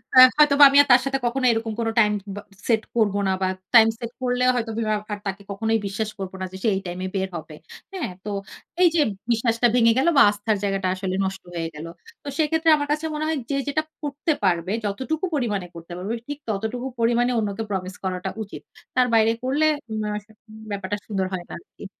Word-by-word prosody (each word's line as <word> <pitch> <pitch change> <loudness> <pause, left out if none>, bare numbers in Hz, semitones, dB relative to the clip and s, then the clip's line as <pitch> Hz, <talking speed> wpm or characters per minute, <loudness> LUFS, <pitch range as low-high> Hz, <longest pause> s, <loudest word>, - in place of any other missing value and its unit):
আ - - +4 0.2
হয়তোবা 295 -1 +6
আমি 275 - +3
আর - - -10
তার 245 +1 +7
সাথে 275 0 0
কখনো 255 +2 0
এইরকম 225 -1 -2
কোনো 225 -1 0
টাইম 210 -1 +5 0.2
ব - - -9 0.3
সেট 220 -2 +3
করবো 205 -3 +2
না। 190 - +2
বা 190 - +2 0.3
টাইম 225 -2 +8
সেট 235 -1 -5
করলেও 250 0 +2
হয়তোবা 225 -2 -1 0.2
আর 205 - -5
তাকে 195 +1 -4
কখনোই 220 +2 0
বিশ্বাস 210 +2 -3
করবো 190 -1 -5
না 185 - -1
যে - - -6
সে - - +2
এই 190 - -2
টাইমে 180 +1 -4
বের 190 0 -1
হবে। 155 -1 -9 0.4
হ্যাঁ? 355 - -3
তো - - -3 0.5
এই 355 - +8
যে - - +3 0.3
বিশ্বাসটা 230 +1 +2
ভেঙে 230 -2 +5
গেল 265 - +2
বা - - +8
আস্থার 210 +1 -1
জায়গাটা 195 -2 0
আসলে 185 0 -3
নষ্ট 190 0 -5
হয়ে 165 -1 -2
গেল। 150 +2 -7 0.4
তো - - -11
সেক্ষেত্রে 320 +1 +2
আমার 290 -1 -2
কাছে 305 +2 -1
মনে 305 - -2
হয় 315 -1 0
যে - - +1
যেটা 310 +2 0 0.2
করতে 290 +3 -1
পারবে, 180 -1 +1
যতটুকু 265 - -2
পরিমাণে 210 -9 -1
করতে 170 +1 -11
পারবে, 195 +5 -4
ঠিক 290 0 -4
ততটুকু 220 +5 -2
পরিমাণে 240 +2 +2
অন্যকে 210 0 -2
promise 185 -2 -4
করাটা 185 0 -2
উচিত। 205 - -10 0.3
তার 255 -1 +4
বাইরে 220 0 +5
করলে 280 +4 +1 0.3
উম 215 0 -2
অ্যা 210 0 -2 0.3
উম 215 - -12
ব্যাপারটা 200 0 -3
সুন্দর 195 -3 -1
হয় 180 -2 -3
না - - -8
আরকি। - - -14
225 Hz, 210 wpm, -23 LUFS, 195-255 Hz, 0.5 s, টাইম